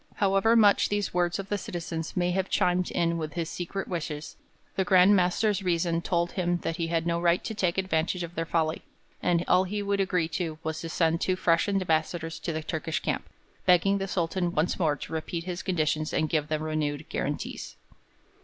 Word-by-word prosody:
However 200 Hz, +3 st, +3 dB
much 205 Hz, -3 st, +5 dB
these 205 Hz, -1 st, -1 dB
words 175 Hz, -1 st, +1 dB
of 195 Hz, 0 st, -6 dB
the 205 Hz, -, 0 dB
citizens 165 Hz, -2 st, -5 dB
may 180 Hz, 0 st, +2 dB
have 190 Hz, +1 st, -1 dB
chimed 180 Hz, 0 st, +2 dB
in 170 Hz, -1 st, 0 dB
with 155 Hz, -2 st, -4 dB
his 170 Hz, -2 st, -3 dB
secret 185 Hz, +2 st, -4 dB
wishes, 155 Hz, -4 st, -4 dB, 0.4 s
the 190 Hz, -, +2 dB
Grand 185 Hz, +1 st, +6 dB
Master's 195 Hz, +3 st, +2 dB
reason 170 Hz, -2 st, +1 dB
told 170 Hz, 0 st, 0 dB
him 175 Hz, -2 st, 0 dB
that 165 Hz, -, -2 dB
he 165 Hz, -2 st, -1 dB
had 165 Hz, 0 st, 0 dB
no 170 Hz, 0 st, 0 dB
right 175 Hz, 0 st, +3 dB
to 220 Hz, -, -4 dB
take 185 Hz, -4 st, 0 dB
advantage 180 Hz, -1 st, 0 dB
of 170 Hz, 0 st, -7 dB
their 165 Hz, -1 st, -3 dB
folly, 160 Hz, -2 st, 0 dB, 0.4 s
and 175 Hz, -1 st, +1 dB
all 185 Hz, +1 st, +4 dB
he 205 Hz, +2 st, -3 dB
would 200 Hz, 0 st, 0 dB
agree 180 Hz, -4 st, +1 dB
to 160 Hz, -2 st, -3 dB
was 160 Hz, 0 st, -3 dB
to 165 Hz, -, -5 dB
send 165 Hz, 0 st, +1 dB
two 185 Hz, -, +1 dB
fresh 170 Hz, 0 st, +2 dB
ambassadors 165 Hz, -3 st, 0 dB
to 170 Hz, -, -3 dB
the 160 Hz, 0 st, -3 dB
Turkish 160 Hz, 0 st, -2 dB
camp, -, -, -3 dB, 0.4 s
begging 190 Hz, +2 st, +4 dB
the 195 Hz, -, -2 dB
Sultan 175 Hz, -1 st, -1 dB
once 160 Hz, +5 st, 0 dB
more 155 Hz, -4 st, +2 dB
to 145 Hz, -, -8 dB
repeat 165 Hz, +1 st, -3 dB
his 180 Hz, 0 st, -4 dB
conditions 155 Hz, -4 st, 0 dB
and 155 Hz, -, +1 dB
give 150 Hz, -2 st, 0 dB
them 155 Hz, 0 st, -2 dB
renewed 155 Hz, -2 st, -2 dB
guarantees. 65 Hz, -, -4 dB
175 Hz, 200 wpm, -28 LUFS, 160-185 Hz, 0.4 s, Grand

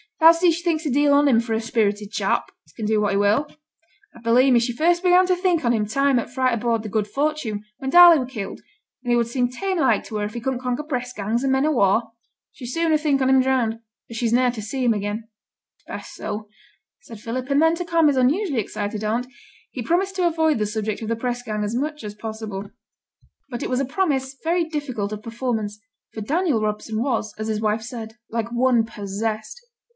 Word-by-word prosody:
Thou 325 Hz, 0 st, +9 dB
sees 335 Hz, 0 st, +3 dB
she 345 Hz, -, -7 dB
thinks 330 Hz, -2 st, 0 dB
a 295 Hz, -, 0 dB
deal 285 Hz, +2 st, +3 dB
on 285 Hz, +1 st, +5 dB
him 240 Hz, -5 st, +5 dB
for 230 Hz, -1 st, -2 dB
a 220 Hz, -, 0 dB
spirited 210 Hz, -2 st, -1 dB
chap, -, -, -1 dB
as -, -, -24 dB
can 220 Hz, -, -5 dB
do 215 Hz, 0 st, +2 dB
what 205 Hz, -, +1 dB
he 195 Hz, -, +1 dB
will. 205 Hz, +8 st, +2 dB, 0.7 s
I -, -, -13 dB
belie' 245 Hz, +3 st, +4 dB
me 240 Hz, -, +6 dB
she 240 Hz, +1 st, -1 dB
first 345 Hz, +5 st, +2 dB
began 365 Hz, 0 st, +5 dB
to 365 Hz, -, +3 dB
think 355 Hz, -3 st, +1 dB
on 235 Hz, -, +3 dB
him 215 Hz, -2 st, +1 dB
time 275 Hz, +3 st, +2 dB
o' -, -, -3 dB
t' -, -, -18 dB
fight 255 Hz, -1 st, +1 dB
aboard 230 Hz, -1 st, 0 dB
th' 215 Hz, -, -6 dB
Good 215 Hz, -1 st, 0 dB
Fortune, 270 Hz, -4 st, -2 dB
when 265 Hz, -1 st, -4 dB
Darley 345 Hz, 0 st, +9 dB
were 255 Hz, -, -2 dB
killed, 215 Hz, -7 st, -6 dB, 0.4 s
and 245 Hz, -, -1 dB
he -, -, +4 dB
would 235 Hz, -1 st, +2 dB
seem 245 Hz, +1 st, 0 dB
tame 375 Hz, +8 st, -2 dB
like 270 Hz, -, +2 dB
to 215 Hz, -, -5 dB
her 205 Hz, -, -1 dB
if 210 Hz, -, -6 dB
he -, -, -2 dB
couldn't 260 Hz, +1 st, -2 dB
conquer 250 Hz, +3 st, -2 dB
press 250 Hz, -5 st, -3 dB
gangs, 220 Hz, +4 st, -2 dB
and 270 Hz, -, +1 dB
men 265 Hz, +2 st, +2 dB
o' 310 Hz, -, +2 dB
war. 225 Hz, -2 st, +2 dB, 0.4 s
She's 245 Hz, -2 st, -8 dB
sooner 330 Hz, -2 st, +2 dB
think 295 Hz, -3 st, +1 dB
on 260 Hz, -, +2 dB
him 265 Hz, 0 st, +5 dB
drowned, 250 Hz, -4 st, 0 dB, 0.3 s
as 230 Hz, -, -7 dB
she's 230 Hz, -1 st, 0 dB
ne'er 250 Hz, 0 st, +3 dB
to 230 Hz, -3 st, -7 dB
see 255 Hz, +5 st, -3 dB
him 240 Hz, -2 st, +4 dB
again.' 210 Hz, +2 st, -4 dB, 0.5 s
'It's -, -, -36 dB
best -, -, -8 dB
so,' 210 Hz, 0 st, -5 dB, 0.5 s
said 230 Hz, -8 st, -11 dB
Philip, 250 Hz, +5 st, -4 dB
and 280 Hz, 0 st, +3 dB
then, 325 Hz, +1 st, +4 dB
to 355 Hz, +1 st, -4 dB
calm 335 Hz, -2 st, +3 dB
his 285 Hz, -2 st, +2 dB
unusually 280 Hz, -, +2 dB
excited 205 Hz, +1 st, -4 dB
aunt, 230 Hz, +4 st, -1 dB, 0.4 s
he 255 Hz, -, -5 dB
promised 380 Hz, -, 0 dB
to 360 Hz, -1 st, +3 dB
avoid 320 Hz, -3 st, +2 dB
the 210 Hz, -, +1 dB
subject 215 Hz, 0 st, -3 dB
of 220 Hz, -, -4 dB
the 230 Hz, -, +1 dB
press 245 Hz, +1 st, -3 dB
gang 215 Hz, -3 st, -3 dB
as 210 Hz, +3 st, -2 dB
much 300 Hz, +2 st, -3 dB
as 210 Hz, -1 st, -6 dB
possible. 215 Hz, -2 st, -6 dB, 0.8 s
But 240 Hz, -2 st, -5 dB
it -, -, -3 dB
was 255 Hz, -, 0 dB
a 275 Hz, -, 0 dB
promise 270 Hz, -3 st, -1 dB
very 335 Hz, +1 st, +1 dB
difficult 275 Hz, -10 st, -4 dB
of 210 Hz, 0 st, -7 dB
performance, 225 Hz, -3 st, -3 dB, 0.3 s
for 220 Hz, -, -6 dB
Daniel 300 Hz, -, +1 dB
Robson 215 Hz, +1 st, -2 dB
was, 240 Hz, -5 st, -1 dB
as 215 Hz, -, -3 dB
his 215 Hz, -1 st, -1 dB
wife 215 Hz, +1 st, 0 dB
said, 225 Hz, -1 st, -8 dB
like 230 Hz, 0 st, -3 dB
one 240 Hz, -1 st, +3 dB
possessed. 215 Hz, -, -4 dB
245 Hz, 235 wpm, -22 LUFS, 220-290 Hz, 0.8 s, Thou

